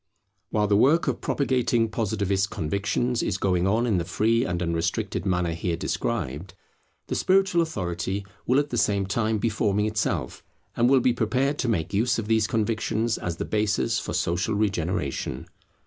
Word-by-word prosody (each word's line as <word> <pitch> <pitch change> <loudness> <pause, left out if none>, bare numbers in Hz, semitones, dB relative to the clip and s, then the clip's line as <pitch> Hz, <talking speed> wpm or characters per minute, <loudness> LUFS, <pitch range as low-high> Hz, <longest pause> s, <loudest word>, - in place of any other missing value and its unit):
While 105 -1 +1
the 100 0 +2
work 145 +10 +4
of - - -1
propagating 125 -4 +1
Positivist 100 -3 -1
convictions 100 +9 -1
is 90 - -1
going 90 -1 +1
on 110 +5 +2
in 105 -7 +1
the - - -1
free 115 +7 +1
and 85 -1 -2
unrestricted 85 +3 -1
manner 90 -2 +1
here 85 0 -2
described, 80 +2 -3 0.5
the - - -4
spiritual 190 -2 +3
authority 95 - -3 0.2
will 125 - +3
at 145 0 +1
the 120 - 0
same 100 -3 +1
time 110 +2 0
be 115 +3 0
forming 105 -1 +1
itself, 110 0 -2 0.3
and 120 +1 +3
will 135 -1 +5
be 125 0 +3
prepared 130 +5 0
to 130 - 0
make 85 -5 -1
use 115 +5 +2
of 110 -2 -3
these 110 -1 +2
convictions 110 +1 0
as 85 -2 -3
the - - -3
basis 105 -1 0
for - - -5
social 90 +5 0
regeneration. 90 -10 -2
105 Hz, 170 wpm, -25 LUFS, 90-115 Hz, 0.5 s, will